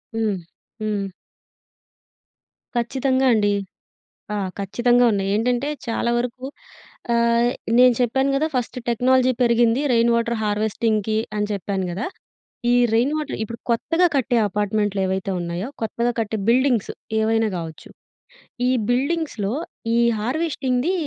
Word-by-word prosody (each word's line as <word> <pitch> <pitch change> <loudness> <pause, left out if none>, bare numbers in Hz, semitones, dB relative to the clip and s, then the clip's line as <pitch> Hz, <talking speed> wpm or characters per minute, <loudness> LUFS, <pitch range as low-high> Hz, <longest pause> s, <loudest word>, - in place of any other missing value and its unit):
హ్మ్. 220 -3 0 0.5
హ్మ్. 205 -2 -1 1.7
ఖచ్చితంగా 260 +2 +1
అండి. 205 -2 +2 0.8
ఆ! - - -1 0.2
ఖచ్చితంగా 240 +5 +3
ఉన్నాయి. 195 -2 -1
ఏంటంటే 245 +5 0 0.2
చాలా 235 - 0
వరకు 250 +1 -4 0.7
ఆహ్, 235 0 +3 0.3
నేను 250 0 +7
చెప్పాను 265 +3 +2
కదా! 300 +3 +1
ఫస్టు 250 0 -2
టెక్నాలజీ 255 +2 +3
పెరిగింది 235 +1 +3
రెయిన్ 235 0 +4
వాటర్ 235 0 0
హార్వెస్టింగ్‌కి 215 0 0 0.2
అని 210 0 0
చెప్పాను 195 -1 -2
కదా! 195 +5 -3 0.7
ఈ - - +4 0.2
రెయిన్ 245 +6 +2
వాటర్ 305 -2 -4
ఇప్పుడు 230 +1 -7
కొత్తగా 330 +9 +2
కట్టే 250 -3 +2
అపార్ట్మెంట్లేవైతే 200 -2 -1
ఉన్నాయో 175 +4 -3
కొత్తగా 235 +2 0
కట్టే 220 -1 -1
బిల్డింగ్సు 245 -2 +2 0.3
ఏవైనా 225 0 +2
కావచ్చు, 165 -2 -8 0.8
ఈ - - +3 0.2
బిల్డింగ్స్‌లో 260 -5 0 0.4
ఈ - - +4 0.2
హార్వెస్టింగ్‌ది 265 - 0
235 Hz, 115 wpm, -22 LUFS, 210-250 Hz, 1.7 s, నేను